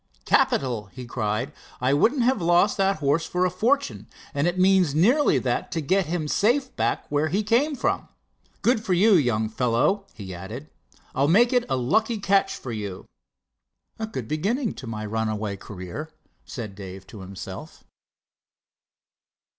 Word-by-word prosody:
"Capital!" 120 -6 +2
he 125 +6 -9
cried. 120 +3 -2 0.3
"I 130 +2 +2
wouldn't 240 - +3
have 255 -3 +2
lost 175 +4 +3
that 195 0 +2
horse 150 +3 +1
for 180 +1 +1
a 180 - +1
fortune, 270 +10 0 0.3
and 145 +3 +1
it 175 +1 -1
means 185 -5 +4
nearly 235 - +4
that 125 -1 -1
to 165 - -1
get 185 +5 +1
him 160 -2 -2
safe 250 - +1
back - - 0
where 145 +2 +2
he 200 +7 0
came 255 +8 +2
from. - - -1 0.6
Good 230 -2 +2
for 190 - 0
you, 205 +5 +5
young 120 - +2
fellow," 125 - +1
he 95 -4 -7
added. 110 +12 -8 0.4
"I'll 135 +2 +2
make 235 - +4
it 245 -1 +3
a 135 - +1
lucky 220 - +1
catch 195 -1 +2
for 130 - -7
you." 105 -4 -5 0.9
"A 220 - -2
good 130 - -5
beginning 210 - -1
in 125 - -7
my 110 -1 -4
runaway 110 -1 -2
career," 100 - -7 0.4
said 110 -5 -6
Dave 95 -1 -9
to 105 - -12
himself. 95 0 -9
155 Hz, 160 wpm, -25 LUFS, -, 0.9 s, you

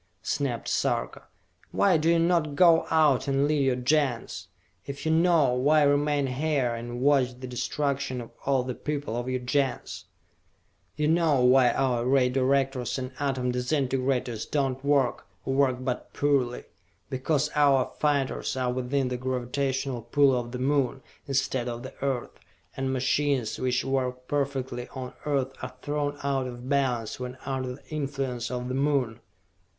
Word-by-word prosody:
snapped 140 -5 -2
Sarka. - - -1 0.4
"Why 195 -3 +3
do 160 +1 +2
you 170 - +4
not 165 -3 +1
go 170 0 +5
out 150 -5 +3
and 140 0 +2
lead 150 -2 +2
your 130 -2 +2
Gens? 125 -7 0 0.4
If 140 +2 -6
you 160 - +2
know, 160 -5 +4
why 145 +4 +4
remain 145 0 +2
here 135 -2 0
and 120 +1 -5
watch 130 -3 +2
the 130 - -6
destruction 135 +1 -2
of 115 - -8
all 135 -2 +2
the 125 0 -4
people 145 -4 -4
of 120 +1 -3
your 130 -1 -1
Gens?" 130 0 -1 0.9
"You 150 - 0
know 155 -5 +3
why 125 0 +6
our 125 -3 +1
Ray 130 0 +3
Directors 135 -1 +1
and 130 0 -4
Atom 130 -3 0
Disintegrators 130 -2 -1
do 145 -2 +1
not 130 +1 -7
work, 140 -3 +1 0.2
or 135 - -1
work 135 -2 +2
but 125 -1 -3
poorly? 135 -4 +1 0.5
Because 150 +3 0
our 140 -3 +3
fighters 140 -3 0
are 125 -1 0
within 130 +1 -1
the 125 - -2
gravitational 130 0 -2
pull 135 +3 +3
of 120 -1 -3
the 125 - -4
Moon, 135 0 0 0.2
instead 130 -2 0
of 120 0 -6
the 130 - -8
Earth, 135 -3 -2 0.4
and 135 0 -2
machines 130 -1 0
which 130 0 0
work 125 -1 -2
perfectly 135 -4 -2
on 130 -1 -6
Earth 135 -2 0
are 125 - -6
thrown 145 -1 -2
out 135 -2 0
of 120 0 -8
balance 125 -6 0
when 125 0 -6
under 130 -2 -3
the - - -20
influence 135 -5 -3
of 125 0 -4
the 130 - -3
Moon!" 135 -4 0
135 Hz, 160 wpm, -27 LUFS, 125-145 Hz, 0.9 s, why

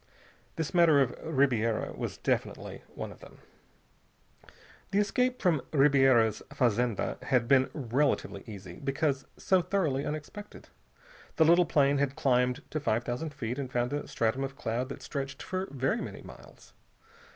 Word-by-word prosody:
This 160 +1 -3
matter 170 -5 +6
of 135 -3 +3
Ribiera 125 -7 +1
was - - -5
definitely - - -2
one - - -5
of - - -14
them. - - -14 1.5
The 195 - -1
escape 250 +5 +1
from 165 -7 +2
Ribiera's 135 -6 +4
fazenda 120 -2 0
had 125 -4 +2
been 130 0 +4
relatively 135 +1 -1
easy, 95 -5 -9
because 140 0 -1
so 190 -1 +3
thoroughly 165 -7 0
unexpected. 155 +9 -7 0.7
The 160 - +4
little 170 +1 +5
plane 140 -1 +3
had 140 -1 0
climbed 125 +2 +1
to 155 - -1
five 120 -5 0
thousand 125 +6 -3
feet 125 -1 -4
and 130 -2 -4
found 120 +2 0
a 145 - -3
stratum 115 +4 0
of 135 0 -5
cloud 125 0 -2
that - - -8
stretched 140 +1 -5
for 185 +1 -3
very 135 -1 -1
many - - -7
miles. - - -14
135 Hz, 150 wpm, -29 LUFS, 125-155 Hz, 1.5 s, matter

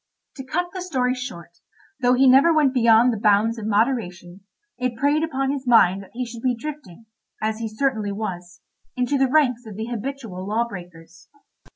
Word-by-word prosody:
To 265 - -6
cut 350 +7 -2
the 370 - -5
story 255 -8 0
short, 175 -10 -8 0.4
though 250 0 +3
he 265 +2 +4
never 270 +6 +6
went 300 -5 +3
beyond 235 -1 +4
the 220 - -4
bounds 215 +2 +2
of 215 - -5
moderation, 205 -6 -1 0.4
it 250 -1 -2
preyed 290 +4 +2
upon 270 -4 -1
his 275 -2 -5
mind 195 -5 +4
that 195 - -14
he 250 +1 -3
should 235 -1 -9
be 250 -1 +1
drifting, 250 - -9 0.3
as 215 0 -2
he 230 - -3
certainly 215 -2 -1
was, 180 -4 -6 0.3
into 255 +3 0
the 265 -1 +2
ranks 255 -5 +2
of 210 - -9
the 220 +2 -4
habitual 230 -6 -6
law 225 +3 0
breakers. 175 -4 -12
235 Hz, 185 wpm, -22 LUFS, 205-265 Hz, 0.4 s, never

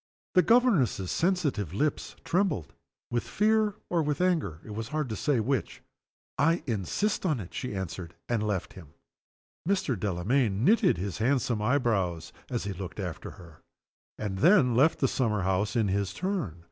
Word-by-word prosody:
The 180 - +6
governess's 180 - +3
sensitive 150 - 0
lips 150 +5 -1
trembled, 165 - 0 0.4
with 120 0 +1
fear 215 0 +2
or 170 -2 +1
with 150 -2 -1
anger, 165 - +1
it 110 - -8
was 110 +1 -4
hard 150 -1 -2
to 110 - -3
say 140 0 +1
which. 125 +1 -2 0.6
"I 165 +4 +3
insist 120 - -1
on 155 -9 +1
it!" 90 -4 -8
she 125 -5 -4
answered, 90 -2 -5
and 120 -3 0
left 105 -4 -2
him. 80 -6 -13 0.7
Mr. 190 -9 +1
Delamayn 105 +4 0
knitted 220 - +4
his 95 +3 -4
handsome 120 -2 +1
eyebrows 105 - 0 0.2
as 120 -2 -2
he 100 -1 -3
looked 95 +2 -7
after 90 -5 -5
her, 85 -3 -15 0.6
and 100 -3 -4
then 165 - +5
left 140 +7 +4
the 135 - +2
summer 110 -7 0
house 95 +2 0
in 110 -3 +2
his 100 0 -1
turn. 180 - -2
115 Hz, 160 wpm, -28 LUFS, 95-155 Hz, 0.7 s, The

